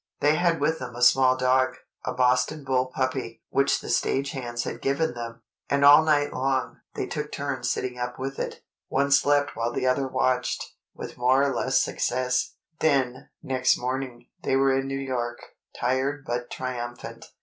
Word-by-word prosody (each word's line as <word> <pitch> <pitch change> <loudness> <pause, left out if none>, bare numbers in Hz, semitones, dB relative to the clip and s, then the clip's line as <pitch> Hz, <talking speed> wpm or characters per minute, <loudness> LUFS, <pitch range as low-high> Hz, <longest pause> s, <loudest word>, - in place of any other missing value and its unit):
They 150 +1 +4
had 170 +1 +2
with 160 0 +1
them 125 -2 -7
a 120 - -7
small 130 +1 +5
dog—a 130 0 0
Boston 125 +4 +2
bull 130 -1 +1
puppy, 130 -2 -3
which 140 0 +2
the - - -8
stage 140 +1 0
hands 120 -3 -4
had 120 - -5
given 140 +2 0
them—and 120 +4 -3
all 145 +2 +9
night 145 -2 +2
long, 130 -1 -1 0.2
they - - -2
took - - -5
turns - - -3
sitting 125 -1 -2
up 125 0 -4
with 135 +1 -5
it. - - -5 0.2
One 140 +1 0
slept 145 0 +3
while 115 +1 -1
the 125 - -2
other 130 +1 +2
watched, 130 -1 -1 0.2
with - - -8
more 130 +2 +4
or 140 -1 +1
less - - +1
success. 125 0 -1 0.2
Then, 130 -4 +1
next 130 -1 +2
morning, 125 -1 -4 0.2
they 135 - 0
were 135 0 +3
in 135 0 -1
New 135 0 -3
York, 125 -3 -3 0.4
tired 135 +3 0
but 120 0 -3
triumphant. 120 -2 -6
130 Hz, 170 wpm, -26 LUFS, 125-135 Hz, 0.4 s, all